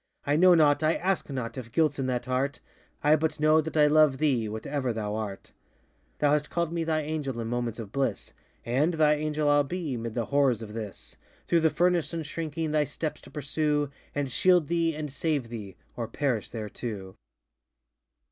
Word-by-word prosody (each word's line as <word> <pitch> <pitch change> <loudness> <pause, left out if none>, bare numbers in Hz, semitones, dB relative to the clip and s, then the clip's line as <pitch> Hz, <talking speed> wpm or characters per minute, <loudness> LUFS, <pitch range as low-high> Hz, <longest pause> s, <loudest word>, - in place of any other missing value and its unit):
I 145 - +2
know 180 +2 +7
not, 145 -2 +4
I 155 +1 +3
ask 190 -2 -1
not, 130 -2 -4
if 115 -2 -9
guiltŌĆÖs 150 0 +1
in 130 - -1
that 125 -1 -1
heart, 130 +2 -1 0.4
I 150 +1 +6
but 155 0 -1
know 155 +1 +5
that 160 +1 -5
I 150 - +6
love 150 -2 +5
thee, 130 -7 +1
whatever 125 +4 -2
thou 105 -2 -3
art. 105 -3 -5 0.7
Thou 145 -1 +2
hast 150 0 +1
callŌĆÖd 170 -2 -1
me 170 -1 -1
thy 160 -1 0
Angel 145 -5 -3
in 115 - -3
moments 120 -1 -2
of 110 -4 -7
bliss, 140 -1 -2 0.3
And 145 +8 +1
thy 155 -1 +4
Angel 150 0 -1
IŌĆÖll 145 -1 +4
be, 165 -5 -3
ŌĆśmid 115 -1 -5
the 120 -2 0
horrors 135 -5 +2
of 105 -1 -9
this, 110 -3 -7
ŌĆö - - -33
Through 170 - +4
the 160 0 +4
furnace, 175 0 +1
unshrinking, 160 0 -3
thy 150 -1 +3
steps 155 +2 -4
to - - -14
pursue, 145 0 -1 0.2
And 140 -2 -1
shield 180 +2 +3
thee, 165 -2 +1
and 150 -3 -5
save 145 -4 -1
thee, 105 -6 -8 0.2
ŌĆöor 115 -1 -5
perish 125 -6 -1
there 110 -3 -5
too! 100 -5 -6
145 Hz, 195 wpm, -28 LUFS, 120-155 Hz, 0.7 s, know